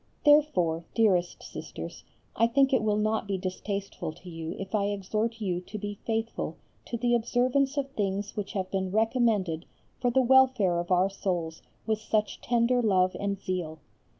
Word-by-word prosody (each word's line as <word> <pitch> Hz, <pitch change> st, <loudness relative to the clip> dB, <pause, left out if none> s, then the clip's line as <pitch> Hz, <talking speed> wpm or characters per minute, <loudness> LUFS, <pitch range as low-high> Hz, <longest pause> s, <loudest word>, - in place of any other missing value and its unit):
Therefore, 185 Hz, -, +4 dB
dearest 185 Hz, -6 st, +2 dB
Sisters, -, -, -8 dB, 0.3 s
I 230 Hz, -, +4 dB
think 270 Hz, +3 st, +3 dB
it 255 Hz, -, +4 dB
will 210 Hz, -1 st, +1 dB
not 215 Hz, 0 st, 0 dB
be 195 Hz, -1 st, -1 dB
distasteful 195 Hz, -1 st, -4 dB
to 180 Hz, -, -12 dB
you 165 Hz, -1 st, -5 dB
if 195 Hz, -1 st, -7 dB
I 205 Hz, -2 st, +2 dB
exhort 215 Hz, +3 st, -2 dB
you 180 Hz, -4 st, -1 dB
to 210 Hz, +4 st, -8 dB
be 205 Hz, 0 st, -5 dB
faithful 225 Hz, 0 st, -2 dB, 0.3 s
to 235 Hz, -, -3 dB
the 240 Hz, +1 st, +1 dB
observance 250 Hz, +4 st, +1 dB
of 280 Hz, -1 st, 0 dB
things 200 Hz, -3 st, -2 dB
which 205 Hz, -2 st, -4 dB
have 190 Hz, -2 st, -3 dB
been 190 Hz, -1 st, -1 dB
recommended 215 Hz, -6 st, +1 dB, 0.3 s
for 245 Hz, -, +2 dB
the 260 Hz, +2 st, +3 dB
welfare 250 Hz, -8 st, +4 dB
of 175 Hz, -, -4 dB
our 185 Hz, +1 st, +3 dB
souls 175 Hz, -5 st, -3 dB, 0.2 s
with 220 Hz, -1 st, 0 dB
such 215 Hz, -1 st, -1 dB
tender 245 Hz, +1 st, +2 dB
love 185 Hz, -4 st, +3 dB
and 200 Hz, -1 st, -2 dB
zeal. 180 Hz, -5 st, -3 dB
205 Hz, 170 wpm, -28 LUFS, 185-235 Hz, 0.3 s, Therefore